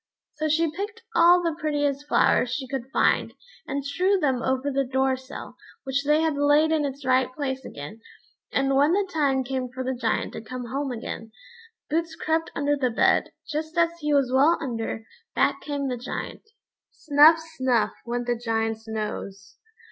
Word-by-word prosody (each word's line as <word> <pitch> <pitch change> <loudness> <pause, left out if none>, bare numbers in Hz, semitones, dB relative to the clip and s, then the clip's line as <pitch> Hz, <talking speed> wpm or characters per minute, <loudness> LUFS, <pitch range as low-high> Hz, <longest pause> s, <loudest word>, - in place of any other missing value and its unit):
So 310 +1 -2
she 320 +1 +2
picked 415 +7 -6
all 350 -1 +6
the 335 -1 0
prettiest 290 -2 -1
flowers 250 - +3
she 265 0 -3
could 265 -1 -5
find, - - +2 0.3
and 280 0 -3
strewed 370 +7 +1
them 260 -4 +1
over 265 +2 0
the 275 0 +1
door 265 0 +1
sill, 260 +1 -10 0.3
which 270 +1 -1
they 300 +2 +4
had 320 -3 0
laid 290 +2 +4
in 310 -2 +2
its 275 0 -5
right 255 -1 +3
place 265 -1 -3
again; 175 +9 -9 0.5
and 275 0 +1
when 290 +4 +4
the 400 0 +1
time 275 -4 +2
came 255 0 -3
for 260 +1 -5
the 260 +1 -1
Giant 235 -3 -1
to - - -6
come 250 +2 -6
home 270 +3 -3
again, 225 -1 -6 0.6
Boots 325 +1 -1
crept 320 0 -1
under 290 0 +1
the 265 -3 0
bed. 225 - +2 0.2
Just 315 +2 -4
as 335 0 +4
he 300 -1 -1
was 275 -3 +3
well 290 +6 +5
under, 225 -5 -4 0.3
back - - +2
came 285 -2 -3
the 250 -1 -2
Giant. 250 - -6 0.4
Snuff 305 +2 +6
snuff, 260 -9 0
went 240 0 -3
the 240 0 0
Giant's 225 -1 -2
nose. 205 -3 -5
275 Hz, 180 wpm, -25 LUFS, 250-310 Hz, 0.6 s, all